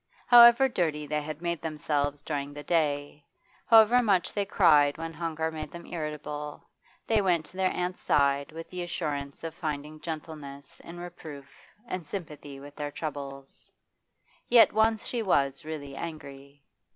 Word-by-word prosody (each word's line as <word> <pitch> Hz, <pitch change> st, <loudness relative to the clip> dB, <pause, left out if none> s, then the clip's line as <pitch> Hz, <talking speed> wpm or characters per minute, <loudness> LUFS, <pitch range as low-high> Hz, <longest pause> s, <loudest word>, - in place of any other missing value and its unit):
However 240 Hz, +2 st, +8 dB
dirty 160 Hz, -, -1 dB
they 150 Hz, +1 st, -1 dB
had 155 Hz, +2 st, -7 dB
made, 170 Hz, -2 st, -2 dB
themselves 145 Hz, -2 st, -2 dB
during 145 Hz, -1 st, -4 dB
the 145 Hz, -, -7 dB
day, 145 Hz, -2 st, -1 dB, 0.4 s
however 230 Hz, +2 st, +7 dB
much 195 Hz, -6 st, +1 dB
they 205 Hz, -1 st, -1 dB
cried 150 Hz, -8 st, +4 dB
when 165 Hz, 0 st, -5 dB
hunger 160 Hz, 0 st, -3 dB
made 155 Hz, -1 st, -6 dB
them 170 Hz, +4 st, -10 dB
irritable, 150 Hz, -2 st, -6 dB, 0.4 s
they 220 Hz, -2 st, +2 dB
went 175 Hz, -5 st, +1 dB
to 165 Hz, +5 st, -15 dB
their 190 Hz, -1 st, +2 dB
aunt's 180 Hz, 0 st, -3 dB
side 140 Hz, 0 st, +2 dB
with 165 Hz, +1 st, -8 dB
the 180 Hz, -1 st, -5 dB
assurance 145 Hz, -5 st, -4 dB
of 165 Hz, -1 st, -5 dB
finding 155 Hz, -2 st, -5 dB
gentleness 150 Hz, -4 st, -8 dB
in 175 Hz, +1 st, -10 dB
reproof 160 Hz, -5 st, -9 dB, 0.3 s
and 185 Hz, -6 st, -4 dB
sympathy 150 Hz, -6 st, -7 dB
with 145 Hz, +1 st, -12 dB
their 145 Hz, -1 st, -4 dB
troubles. 140 Hz, -3 st, -7 dB, 0.8 s
Yet 235 Hz, -2 st, +7 dB
once 220 Hz, +1 st, +2 dB
she 240 Hz, -, -2 dB
was 140 Hz, -9 st, +1 dB
really 145 Hz, -3 st, -7 dB
angry. 140 Hz, -3 st, -9 dB
155 Hz, 150 wpm, -28 LUFS, 145-175 Hz, 0.8 s, However